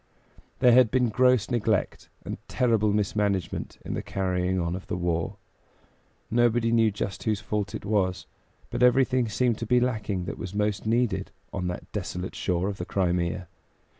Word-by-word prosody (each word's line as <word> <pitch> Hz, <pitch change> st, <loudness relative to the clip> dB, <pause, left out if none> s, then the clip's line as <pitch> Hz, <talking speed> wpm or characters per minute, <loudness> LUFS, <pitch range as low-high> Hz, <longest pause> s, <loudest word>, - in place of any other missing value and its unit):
There 125 Hz, -, +7 dB
had 125 Hz, -1 st, +6 dB
been 125 Hz, -1 st, +2 dB
gross 125 Hz, -1 st, +3 dB
neglect 110 Hz, -4 st, 0 dB, 0.2 s
and -, -, -5 dB
terrible 115 Hz, -4 st, +2 dB
mismanagement 100 Hz, -3 st, -1 dB
in -, -, -3 dB
the -, -, -2 dB
carrying 95 Hz, -1 st, -1 dB
on 85 Hz, 0 st, -1 dB
of 95 Hz, -, -8 dB
the -, -, -2 dB
war. 85 Hz, -2 st, -1 dB, 1.0 s
Nobody 120 Hz, 0 st, +3 dB
knew 115 Hz, -1 st, +4 dB
just 100 Hz, -1 st, -4 dB
whose 110 Hz, -2 st, 0 dB
fault 105 Hz, -1 st, -3 dB
it -, -, -7 dB
was, 100 Hz, -3 st, 0 dB, 0.5 s
but -, -, -3 dB
everything 125 Hz, -1 st, +4 dB
seemed 120 Hz, +1 st, +1 dB
to 115 Hz, -, -4 dB
be 125 Hz, +2 st, +4 dB
lacking 110 Hz, -7 st, -1 dB
that -, -, -6 dB
was 95 Hz, +2 st, -6 dB
most 105 Hz, 0 st, -1 dB
needed 120 Hz, +1 st, +1 dB, 0.2 s
on 90 Hz, -2 st, -2 dB
that 90 Hz, -, -6 dB
desolate 90 Hz, +1 st, -4 dB
shore 90 Hz, 0 st, -1 dB
of 100 Hz, -1 st, -3 dB
the 90 Hz, -, -3 dB
Crimea. 90 Hz, -2 st, -1 dB
105 Hz, 165 wpm, -27 LUFS, 95-120 Hz, 1.0 s, There